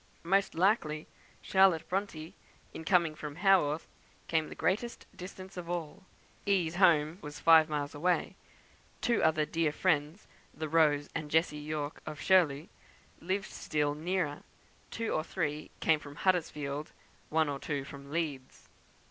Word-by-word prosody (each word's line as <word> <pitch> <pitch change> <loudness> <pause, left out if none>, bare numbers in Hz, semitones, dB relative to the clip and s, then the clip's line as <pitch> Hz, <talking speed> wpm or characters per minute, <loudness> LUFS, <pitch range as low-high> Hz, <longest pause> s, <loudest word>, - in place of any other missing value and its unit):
Most 195 +3 +2
likely 165 -5 +1 0.4
Charlotte 190 -4 +4
Bronte, 180 -4 -3 0.4
in - - -7
coming 170 -2 +3
from 150 -1 -7
Haworth, 165 -5 +3 0.4
came 160 -1 0
the - - -8
greatest 230 +6 -1
distance 185 +1 -9
of 175 -1 -6
all. 170 -4 -4 0.5
"E.'s" 175 -4 +1
home 165 -3 +4
was 150 0 -8
five 160 -1 +6
miles 145 -1 -2
away; 175 +4 0 0.6
two 235 -2 +1
other 155 -1 +3
dear 165 -1 0
friends 155 +2 0 0.3
(the 155 - -4
Rose 150 -2 +3
and 155 -3 -4
Jessie 160 0 +2
Yorke 150 0 -4
of 155 -1 -6
"Shirley") 160 -3 +3 0.5
lived 190 +3 -2
still 150 -1 -1
nearer; 160 -1 -2 0.5
two 230 -1 -3
or 155 - 0
three 155 -3 -3
came 160 -1 +3
from 145 -1 -11
Huddersfield; 150 -5 -1 0.4
one 160 0 +2
or 140 -1 -3
two 145 -2 -3
from 140 0 -11
Leeds. 150 -5 -4
160 Hz, 140 wpm, -31 LUFS, 150-180 Hz, 0.6 s, five